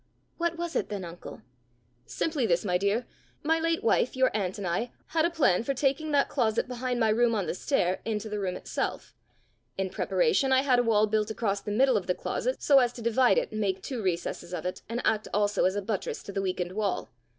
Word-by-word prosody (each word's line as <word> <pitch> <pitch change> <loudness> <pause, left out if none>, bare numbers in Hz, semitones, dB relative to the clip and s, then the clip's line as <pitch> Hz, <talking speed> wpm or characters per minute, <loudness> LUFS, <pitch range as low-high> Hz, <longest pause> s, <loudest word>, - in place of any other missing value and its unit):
"What 340 0 0
was 340 0 -4
it - - 0
then, 200 -3 -4
uncle?" 170 -8 -10 0.6
"Simply 295 -8 -1
this, 175 +2 +1
my 180 -2 +1
dear: 200 +5 0 0.4
my 320 +2 +2
late 330 0 0
wife, 235 +3 +2
your 260 -3 +2
aunt, 190 -2 -1
and 200 - -5
I, 185 +8 -1 0.2
had 320 0 +2
a - - +2
plan 280 - +2
for 275 +4 -2
taking 275 +4 0
that 285 -1 +3
closet 230 -4 0
behind 250 0 -2
my 225 -2 +3
room 230 +1 +3
on 200 -4 0
the - - -2
stair 185 -2 0
into 220 -1 -3
the 210 -1 -3
room 185 -2 -2
itself. - - -4 0.6
In 190 -1 -2
preparation, 420 - +1
I 260 0 +4
had 255 -3 +3
a - - +3
wall 215 -2 +4
built 215 0 0
across 205 -3 -1
the - - -6
middle 250 +3 +3
of 190 - -4
the 180 - +1
closet, - - -3
so 280 -2 +6
as 245 -2 +2
to 235 - -8
divide 245 - +4
it - - 0
and 215 - -3
make 190 -2 -1
two 255 -4 -4
recesses 175 -1 -2
of - - -6
it, 180 - -3
and 235 +2 -2
act 215 -1 +1
also 205 0 +2
as 190 +1 +2
a 205 - -2
buttress 205 -1 -3
to - - -7
the 195 0 -2
weakened 185 -2 -2
wall. 200 -6 -2
220 Hz, 230 wpm, -28 LUFS, 195-265 Hz, 0.6 s, so